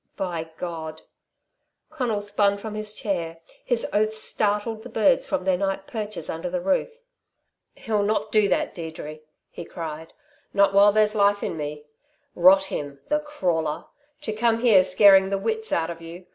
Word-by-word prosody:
"By 170 -4 -4
God 160 -2 -6 0.4
" - - -54
Conal 225 -6 -2
spun 205 -1 +1
from 215 +1 -7
his 215 0 -4
chair. 170 -6 -3 0.3
His 245 -2 +1
oaths 215 +1 +1
startled 215 +1 -1
the 250 - -10
birds 215 -4 +2
from 185 - -2
their 185 -2 +1
night 195 0 -2
perches 215 -2 -5
under 165 +10 -4
the 270 0 -2
roof. 280 - 0 0.9
"He'll 215 -2 -1
not 210 +1 -1
do 210 -2 +3
that, - - 0
Deirdre!" 160 -2 -7 0.3
he - - -8
cried. 160 -2 -8 0.4
"Not 200 -1 +4
while 200 +1 +6
there's 210 0 +2
life 205 -1 +2
in - - -3
me. 150 -1 -6 0.5
Rot 190 +2 +6
him 145 -6 -5
the 300 +1 +2
crawler! 175 - -2 0.4
To 220 -7 -3
come 230 +1 +1
here 215 -7 +6
scaring 190 +1 +6
the 195 - 0
wits 220 +2 -2
out 165 0 0
of 165 0 -9
you. 170 +2 -10
200 Hz, 170 wpm, -24 LUFS, 170-215 Hz, 0.9 s, while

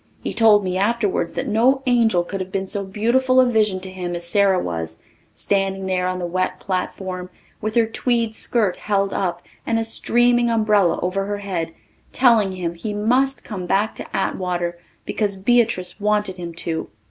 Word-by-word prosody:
He - - -3
told 215 -3 +5
me 185 0 -1
afterwards 205 -5 0
that - - -3
no 255 +5 +3
angel 230 -8 +3
could 195 +3 -5
have 185 0 -6
been 195 0 -2
so 200 +1 -3
beautiful 240 +6 +2
a 255 - +6
vision 215 -5 +2
to 190 0 -8
him 180 -2 -4
as 170 0 -4
Sara 195 0 +3
was, 80 - -4 0.4
standing 195 -1 0
there 185 -1 0
on 185 0 -2
the 180 - -3
wet 185 +2 -1
platform 185 -1 -4 0.3
with 215 +1 -3
her 230 -1 +5
tweed 230 0 0
skirt 215 -7 +1
held 200 -2 0
up 175 -2 -2 0.2
and 225 - 0
a 225 - +1
streaming 240 +1 +2
umbrella 210 -6 +3
over 190 +2 -1
her 205 0 -2
head, 185 -5 -3 0.4
telling 230 -7 +4
him 175 -2 -3
he 205 +5 -5
must 255 +6 +1
come 185 -5 -6
back 205 +4 +1
to - - -6
Atwater 175 -2 -2 0.3
because 205 -2 -1
Beatrice 200 -3 +1
wanted 210 -2 0
him 170 -2 -7
to. 165 -1 -3
195 Hz, 180 wpm, -21 LUFS, 185-225 Hz, 0.4 s, a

